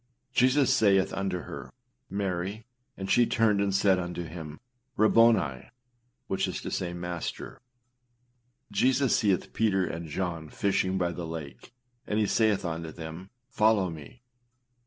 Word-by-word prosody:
âJesus 130 Hz, +2 st, +4 dB
saith 100 Hz, -3 st, +3 dB
unto 95 Hz, -2 st, -2 dB
her, -, -, -8 dB, 0.4 s
Mary, 100 Hz, +2 st, -3 dB, 0.3 s
and 95 Hz, 0 st, -4 dB
she 120 Hz, -1 st, +5 dB
turned 110 Hz, -3 st, +2 dB
and 100 Hz, -1 st, 0 dB
said 100 Hz, -1 st, +4 dB
unto 90 Hz, 0 st, -4 dB
him, 80 Hz, -2 st, -8 dB, 0.4 s
Rabboni, 110 Hz, -, +4 dB, 0.6 s
which 95 Hz, -, -1 dB
is -, -, -4 dB
to -, -, -5 dB
say, 90 Hz, -2 st, -2 dB
Master.â 85 Hz, -1 st, -5 dB, 1.1 s
Jesus 130 Hz, +5 st, +3 dB
seeth 100 Hz, -4 st, +1 dB
Peter 95 Hz, -4 st, +2 dB
and 85 Hz, -1 st, -5 dB
John 80 Hz, -1 st, -3 dB
fishing 95 Hz, -1 st, 0 dB
by 90 Hz, -2 st, 0 dB
the 85 Hz, -1 st, -5 dB
lake, 80 Hz, 0 st, -8 dB, 0.4 s
and 105 Hz, -, -1 dB
he 110 Hz, -, +3 dB
saith 105 Hz, -2 st, +2 dB
unto 80 Hz, -1 st, -4 dB
them, 80 Hz, +3 st, -8 dB, 0.3 s
âFollow 105 Hz, -5 st, +3 dB
me. 80 Hz, -, -12 dB
95 Hz, 135 wpm, -28 LUFS, 85-105 Hz, 1.1 s, she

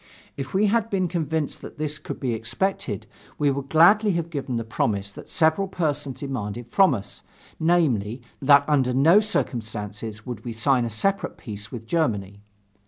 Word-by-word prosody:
If 135 Hz, +5 st, -6 dB
we 205 Hz, +2 st, +4 dB
had 225 Hz, +1 st, +2 dB
been 185 Hz, -3 st, +1 dB
convinced 160 Hz, -3 st, -2 dB
that -, -, -10 dB
this 150 Hz, 0 st, -3 dB
could -, -, -7 dB
be 125 Hz, -4 st, -1 dB
expected, 115 Hz, -, -2 dB, 0.3 s
we 145 Hz, -1 st, +2 dB
would 140 Hz, 0 st, -4 dB
gladly 200 Hz, +7 st, +5 dB
have 170 Hz, -1 st, -2 dB
given 140 Hz, -5 st, -3 dB
the 115 Hz, -, -1 dB
promise 100 Hz, -3 st, -1 dB
that -, -, -12 dB
several 165 Hz, +4 st, +2 dB
persons 150 Hz, -7 st, -2 dB
demanded 120 Hz, -4 st, -4 dB
from 185 Hz, +2 st, +4 dB
us, 100 Hz, -2 st, -8 dB, 0.4 s
namely, 130 Hz, -9 st, +1 dB, 0.2 s
that 140 Hz, +1 st, +6 dB
under 130 Hz, -4 st, +2 dB
no 160 Hz, +9 st, +6 dB
circumstances 110 Hz, -, -3 dB
would 125 Hz, -2 st, -6 dB
we 120 Hz, -, -5 dB
sign 125 Hz, +2 st, +2 dB
a -, -, -2 dB
separate 195 Hz, -, -1 dB
peace 105 Hz, -3 st, -7 dB
with 115 Hz, -3 st, -7 dB
Germany. 100 Hz, -, -1 dB
135 Hz, 170 wpm, -24 LUFS, 115-165 Hz, 0.4 s, that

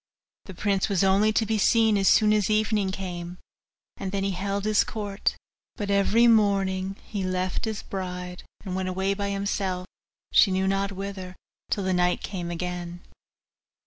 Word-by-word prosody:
The 190 Hz, -, -10 dB
prince 195 Hz, +2 st, 0 dB
was 195 Hz, -2 st, +2 dB
only 195 Hz, +3 st, +4 dB
to 220 Hz, -, +2 dB
be 220 Hz, 0 st, 0 dB
seen 225 Hz, +1 st, +4 dB
as 195 Hz, -1 st, +2 dB
soon 215 Hz, -1 st, +5 dB
as 210 Hz, -1 st, +1 dB
evening 215 Hz, -2 st, +1 dB
came, 180 Hz, -2 st, -6 dB, 0.6 s
and 190 Hz, -, -4 dB
then 195 Hz, 0 st, -1 dB
he 195 Hz, -, 0 dB
held 195 Hz, +2 st, -2 dB
his 215 Hz, 0 st, +4 dB
court; 205 Hz, -2 st, -2 dB, 0.4 s
but 205 Hz, -1 st, -3 dB
every 205 Hz, +4 st, +4 dB
morning 195 Hz, -4 st, +2 dB
he 205 Hz, -3 st, -4 dB
left 185 Hz, +3 st, -1 dB
his 220 Hz, -2 st, -4 dB
bride, 180 Hz, -2 st, -5 dB, 0.2 s
and 185 Hz, -2 st, -3 dB
went 185 Hz, 0 st, -2 dB
away 190 Hz, +2 st, 0 dB
by 200 Hz, 0 st, -3 dB
himself, 195 Hz, -2 st, -2 dB, 0.5 s
she 205 Hz, -, +6 dB
knew 190 Hz, 0 st, +1 dB
not 195 Hz, +1 st, 0 dB
whither, 190 Hz, -1 st, -6 dB, 0.3 s
till 200 Hz, -, -1 dB
the 185 Hz, 0 st, 0 dB
night 180 Hz, 0 st, +1 dB
came 180 Hz, -4 st, -4 dB
again. 175 Hz, 0 st, -5 dB
195 Hz, 170 wpm, -26 LUFS, 185-205 Hz, 0.6 s, she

